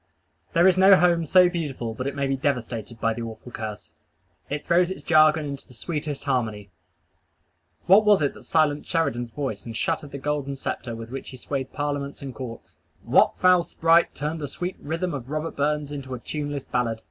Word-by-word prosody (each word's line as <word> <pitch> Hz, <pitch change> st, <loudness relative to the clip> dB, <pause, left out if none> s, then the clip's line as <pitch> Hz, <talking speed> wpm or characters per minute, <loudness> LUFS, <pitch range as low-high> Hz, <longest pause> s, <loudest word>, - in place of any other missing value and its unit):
There 170 Hz, +2 st, +5 dB
is 185 Hz, 0 st, +4 dB
no 195 Hz, +1 st, +8 dB
home 170 Hz, -2 st, +3 dB
so 180 Hz, +3 st, +6 dB
beautiful 145 Hz, -10 st, -3 dB
but 130 Hz, +4 st, -4 dB
it 140 Hz, -, -3 dB
may 140 Hz, -1 st, 0 dB
be 135 Hz, 0 st, 0 dB
devastated 120 Hz, -4 st, -3 dB
by 115 Hz, 0 st, +1 dB
the 120 Hz, -, -6 dB
awful 115 Hz, +1 st, -8 dB
curse. 110 Hz, -3 st, -7 dB, 0.6 s
It 145 Hz, +1 st, -4 dB
throws 175 Hz, +1 st, +3 dB
its 190 Hz, -, -6 dB
jargon 155 Hz, -2 st, +5 dB
into 140 Hz, -1 st, -6 dB
the 125 Hz, -, -16 dB
sweetest 150 Hz, +3 st, -4 dB
harmony. 110 Hz, -8 st, -2 dB, 1.1 s
What 195 Hz, +4 st, +7 dB
was 205 Hz, -6 st, +5 dB
it 145 Hz, -, +1 dB
that -, -, -13 dB
silenced 150 Hz, -2 st, +1 dB
Sheridan's 120 Hz, -8 st, 0 dB
voice 115 Hz, -5 st, -4 dB
and 115 Hz, -1 st, -6 dB
shattered 155 Hz, 0 st, -1 dB
the 140 Hz, -, -6 dB
golden 140 Hz, 0 st, -2 dB
sceptre 125 Hz, -3 st, -4 dB
with 115 Hz, +1 st, -8 dB
which 135 Hz, -, -6 dB
he 130 Hz, -, -9 dB
swayed 135 Hz, +1 st, -4 dB
parliaments 145 Hz, -1 st, -3 dB
and 135 Hz, -2 st, -6 dB
courts? 120 Hz, -3 st, -8 dB, 0.3 s
What -, -, +4 dB
foul 185 Hz, -1 st, +5 dB
sprite 165 Hz, +1 st, +3 dB
turned 155 Hz, +2 st, -3 dB
the 145 Hz, -, -3 dB
sweet 180 Hz, +7 st, -4 dB
rhythm 165 Hz, +4 st, -3 dB
of 130 Hz, -3 st, -6 dB
Robert 155 Hz, +2 st, -3 dB
Burns 150 Hz, 0 st, 0 dB
into 135 Hz, -3 st, -5 dB
a -, -, -8 dB
tuneless 145 Hz, +1 st, -4 dB
ballad? 115 Hz, -3 st, -1 dB
145 Hz, 195 wpm, -25 LUFS, 125-160 Hz, 1.1 s, no